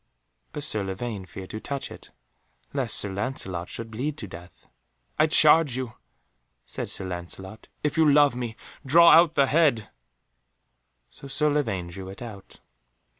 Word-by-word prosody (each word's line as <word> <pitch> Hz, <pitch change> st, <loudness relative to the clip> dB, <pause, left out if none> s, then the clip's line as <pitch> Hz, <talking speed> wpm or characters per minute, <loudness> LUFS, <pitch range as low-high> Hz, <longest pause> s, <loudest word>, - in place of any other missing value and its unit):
But 150 Hz, -, -5 dB
Sir 110 Hz, -8 st, 0 dB
Lavaine 95 Hz, 0 st, -5 dB
feared 95 Hz, +1 st, -9 dB
to 110 Hz, -, -5 dB
touch 140 Hz, +4 st, -5 dB
it, -, -, -12 dB, 0.6 s
lest -, -, +1 dB
Sir 100 Hz, -2 st, 0 dB
Lancelot 95 Hz, -5 st, -4 dB
should 115 Hz, -1 st, -7 dB
bleed 140 Hz, +7 st, -3 dB
to 105 Hz, -, -6 dB
death. 90 Hz, 0 st, -13 dB, 0.5 s
"I 155 Hz, -, +5 dB
charge 155 Hz, -3 st, +6 dB
you," 130 Hz, -4 st, -4 dB, 0.7 s
said -, -, -5 dB
Sir 95 Hz, -, -4 dB
Lancelot, 95 Hz, +3 st, -8 dB, 0.2 s
"if 150 Hz, 0 st, -1 dB
you 155 Hz, -2 st, +5 dB
love 145 Hz, -3 st, +5 dB
me, 120 Hz, -2 st, -4 dB, 0.3 s
draw 170 Hz, +5 st, +6 dB
out 165 Hz, 0 st, +6 dB
the 140 Hz, -, +4 dB
head," 140 Hz, -6 st, +2 dB, 1.2 s
so 140 Hz, -, -11 dB
Sir 150 Hz, +2 st, +1 dB
Lavaine 110 Hz, -12 st, -1 dB
drew 95 Hz, +2 st, -8 dB
it 95 Hz, +5 st, -9 dB
out. 105 Hz, -5 st, -11 dB
120 Hz, 155 wpm, -25 LUFS, 95-145 Hz, 1.2 s, charge